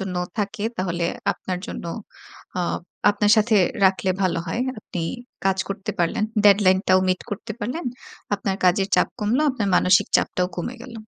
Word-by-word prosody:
জন্য 190 -2 -4 0.2
থাকে, 205 0 -2
তাহলে 175 -2 -1 0.3
আপনার 185 -1 -5
জন্য - - -6 0.7
আ - - +1 0.5
আপনার 205 0 +1
সাথে 215 0 +4 0.3
রাখলে 190 0 +3
ভালো 185 -3 +1
হয়।" 230 +9 -1 0.2
আপনি 185 -4 -6 0.4
কাজ 190 -1 +2
করতে 200 +1 -4
পারলেন 175 +5 +1 0.2
ডেডলাইনটাও 190 -2 +5
মিট 185 0 +1
করতে 210 +2 -5
পারলেন। 250 +11 -3 0.5
আপনার 195 -1 -2
কাজের 190 +2 +3
চাপ - - +3
কমলো। 225 +6 +1
আপনার 225 -6 -2
মানসিক 185 0 +4
চাপটাও 180 0 0
কমে 180 +8 -4
গেলো। 245 -2 -9
195 Hz, 150 wpm, -23 LUFS, 185-215 Hz, 0.7 s, ডেডলাইনটাও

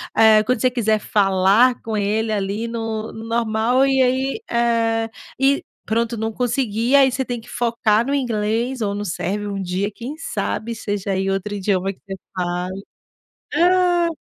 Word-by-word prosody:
eh, 220 -1 +6
quando 250 +1 0
você 255 - +4
quiser 220 -3 +1
falar 200 +5 +3
com 225 -1 -4
ele, 215 +2 0
ali 205 +2 -2
no 225 -1 -4
no 220 0 -9
normal 230 +3 +2
e 270 -1 +3
aí, 260 +6 +1
eh, 230 -1 +1 0.3
e 275 +1 +3 0.2
pronto, 230 +2 0
não 220 0 -2
conseguir, 240 -1 -1
e - - +6
aí, 270 -2 +6
você 265 +1 -2
tem 245 -2 -4
que - - -16
focar 230 -2 +1
no 275 - -1
inglês 235 0 -1
ou 200 -2 0
no 205 - -3
sérvio 205 +2 -3
um 195 - -3
dia, 190 +3 -2
quem 240 +8 -7
sabe 235 -7 -3
seja 205 -3 -3
aí, 190 0 0
outro 195 +2 -2
idioma 195 -1 0
que 195 - -16
você 195 -1 -5 0.2
fale? 180 +1 -3 0.7
Ah! 355 0 +3
225 Hz, 175 wpm, -21 LUFS, 205-245 Hz, 0.7 s, eh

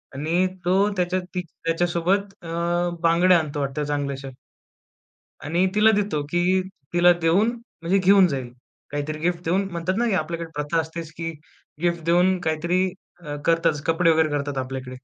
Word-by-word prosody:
आणि 165 +6 +1 0.2
तो 185 +2 +3 0.2
त्याच्या 180 0 0
ती 180 - -1 0.2
त्याच्यासोबत 175 +4 0
अ, - - -9 0.6
बांगड्या 170 +1 +5
आणतो 150 -2 -4
वाटत 135 +1 -3
चांगल्याशा. 140 -2 -3 1.2
आणि 170 +5 +1
तिला 215 +1 +5
देतो, 200 -8 0
की 180 +2 +2 0.3
तिला 175 0 +6
देऊन 180 +7 +3 0.3
म्हणजे 185 +4 +2
घेऊन 190 0 +6
जाईल. 130 -4 -4 0.4
काहीतरी 145 +1 -3
गिफ्ट 175 +2 -1
देऊन 190 +4 +1
म्हणतात 170 +2 -2
ना, 235 -5 +1
आपल्याकडे 165 +1 -4
प्रथा 150 +3 0
असतेच, 160 0 -6
की 165 0 -3 0.5
गिफ्ट 170 -2 0
देऊन 180 +2 +3
काहीतरी 170 +4 +1 0.4
अ, 145 - -4
करतातच 165 -3 +2
कपडे 165 +1 +3
वगैरे 160 -1 +3
करतात 145 -2 -2
आपल्याकडे. 130 0 -5
170 Hz, 150 wpm, -23 LUFS, 150-180 Hz, 1.2 s, तिला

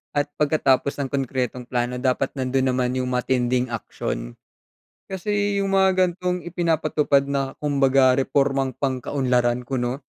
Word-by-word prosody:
at 145 0 0
pagkatapos 140 -3 +2
ng 135 -2 -2
konkretong 125 -2 -2
plano 125 0 -2
dapat 130 +1 0
nandun 130 0 +1
naman 125 0 0
yung 125 0 -2
matinding 125 0 +1
aksyon. - - -5 0.8
Kasi 205 +1 -1
yung 195 0 -1
mga 190 0 +5 0.2
gantong 180 0 -3
ipinapatupad 155 -5 +1
na 135 -1 -1
kumbaga 135 -2 +3
repormang 135 -1 +1
pangkaunlaran 125 -2 0
kuno, 125 +1 -2
135 Hz, 125 wpm, -23 LUFS, 125-145 Hz, 0.8 s, mga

